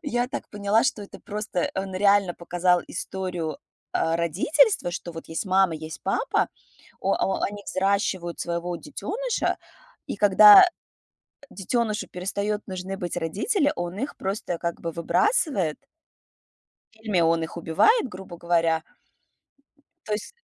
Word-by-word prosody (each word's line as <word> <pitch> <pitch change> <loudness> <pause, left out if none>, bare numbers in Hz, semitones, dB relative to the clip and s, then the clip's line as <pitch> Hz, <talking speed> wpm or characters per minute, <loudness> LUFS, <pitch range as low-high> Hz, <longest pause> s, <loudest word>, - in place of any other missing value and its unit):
Я 245 -5 0
так - - -6
поняла, 205 +2 +2
что 210 - 0
это 200 - -11
просто 210 -4 -3
он 190 0 -4
реально 200 -1 +3
показал 175 0 +1
историю, 180 -4 -4 0.3
а, 165 0 +1
родительства, 195 - +2
что 175 -1 -6
вот 165 - -9
есть 160 - -3
мама, 190 -3 +3
есть 155 0 -8
папа, - - 0 0.5
о - - +1
о 190 - -1
они 205 0 -3
взращивают 190 -3 -1
своего 175 +1 -2
детёныша, 425 - -2 0.5
и, - - -4
когда, 205 - +9
э, - - +7 0.8
детёнышу 215 +2 -2
перестаёт 200 +3 -3
нужны 190 +1 -5
быть 175 -1 -4
родители, 215 - 0
он 175 +2 -4
их 275 +4 -4
просто 190 -3 -3
как 170 0 -3
бы 165 - -3
выбрасывает. 190 - +1 1.1
Или 215 -5 -1
он 165 0 +2
их 160 - -7
убивает, 260 - +3
грубо 185 -4 -10
говоря. 165 -2 +1 1.2
То 215 - -1
есть, 210 +2 -5
190 Hz, 135 wpm, -25 LUFS, 170-210 Hz, 1.2 s, когда